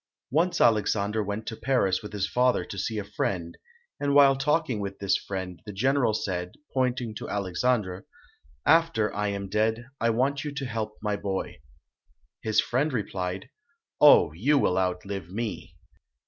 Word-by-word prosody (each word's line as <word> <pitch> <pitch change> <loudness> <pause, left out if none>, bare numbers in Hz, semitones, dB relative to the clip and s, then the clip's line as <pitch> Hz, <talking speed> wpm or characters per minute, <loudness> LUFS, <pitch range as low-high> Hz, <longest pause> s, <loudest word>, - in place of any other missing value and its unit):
Once 170 +6 +2
Alexandre 105 -1 +2
went 105 +2 -4
to 110 - -5
Paris 110 -8 +1
with 105 - -8
his 100 -2 -1
father 125 +2 +2
to - - -8
see 110 +2 -2
a 105 - -2
friend, 95 -4 -3 0.4
and 145 0 0
while 140 -1 +7
talking 135 -3 0
with 100 -1 -4
this 100 -1 +1
friend, 95 -2 -5
the - - -4
general 130 +4 +2
said, 90 -3 -3 0.2
pointing 125 -3 0
to 105 - -7
Alexandre, 100 0 -1 0.6
"After 160 -10 +3
I 105 0 0
am 100 -1 -3
dead, 110 +4 0
I 115 - +2
want 135 +5 +1
you 150 - -4
to 140 -1 -3
help 110 -3 -4
my 105 -1 0
boy". 95 -8 -4 0.8
His 110 -1 +1
friend 140 +5 +1
replied, 95 -1 -3 0.5
"Oh, 145 - +7
you 125 - +2
will 95 -8 +2
outlive 95 0 -3
me". 100 -5 -5
105 Hz, 160 wpm, -27 LUFS, 95-125 Hz, 0.8 s, while